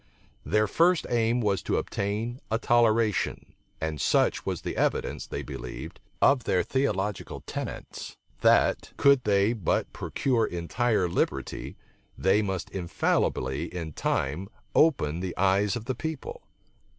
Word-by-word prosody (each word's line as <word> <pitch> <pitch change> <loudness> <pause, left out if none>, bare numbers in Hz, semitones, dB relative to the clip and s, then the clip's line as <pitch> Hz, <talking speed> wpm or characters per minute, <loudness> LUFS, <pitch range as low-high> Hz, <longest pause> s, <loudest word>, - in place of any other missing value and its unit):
Their 105 0 +2
first 170 - +3
aim 120 0 +2
was 100 -5 +1
to - - 0
obtain 110 +5 -2
a 110 - +1
toleration; 115 -3 +2 0.3
and 80 -2 -3
such - - +2
was - - -2
the - - -3
evidence, - - -1
they - - -4
believed, - - -7 0.2
of 135 -4 +4
their 90 -1 +2
theological 105 -7 -1
tenets, - - -6 0.2
that, - - +3
could 140 -2 +5
they 100 +2 +3
but 105 -9 -1
procure 120 -5 0
entire 95 +4 0
liberty, 70 -5 -2 0.4
they 95 +3 +3
must 95 -4 -3
infallibly 70 -6 0
in 85 -3 -5
time 75 +11 -1 0.2
open 85 - +3
the 90 -1 -4
eyes 100 +2 +2
of 115 -2 -5
the 130 - -1
people. 155 +3 -5
105 Hz, 130 wpm, -27 LUFS, 90-120 Hz, 0.4 s, could